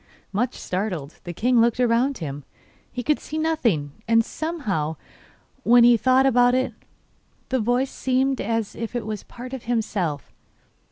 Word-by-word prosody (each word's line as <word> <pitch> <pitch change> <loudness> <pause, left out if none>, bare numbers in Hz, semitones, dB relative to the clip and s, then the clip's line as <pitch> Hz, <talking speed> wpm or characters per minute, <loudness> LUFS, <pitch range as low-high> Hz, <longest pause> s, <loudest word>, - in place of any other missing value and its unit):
Much 240 +5 0
startled, 180 -6 -4
the 175 - -4
king 235 +6 +2
looked 235 +1 +2
about 245 +2 +2
him. 145 -3 -6 0.5
He 245 - -4
could 300 +4 +1
see 310 - -6
nothing, 235 - 0 0.2
and 230 0 +4
somehow, 215 - -2 0.7
when 240 +1 +6
he 240 0 +7
thought 260 +3 +4
about 245 -1 +4
it, 260 0 0 0.8
the 260 - +1
voice 245 +4 +1
seemed 265 +1 0
as 225 -2 -2
if 230 +1 -5
it 240 - -2
were 215 -1 -3
part 250 +2 -9
of 265 - -6
himself. 205 - -2
235 Hz, 155 wpm, -24 LUFS, 210-255 Hz, 0.8 s, he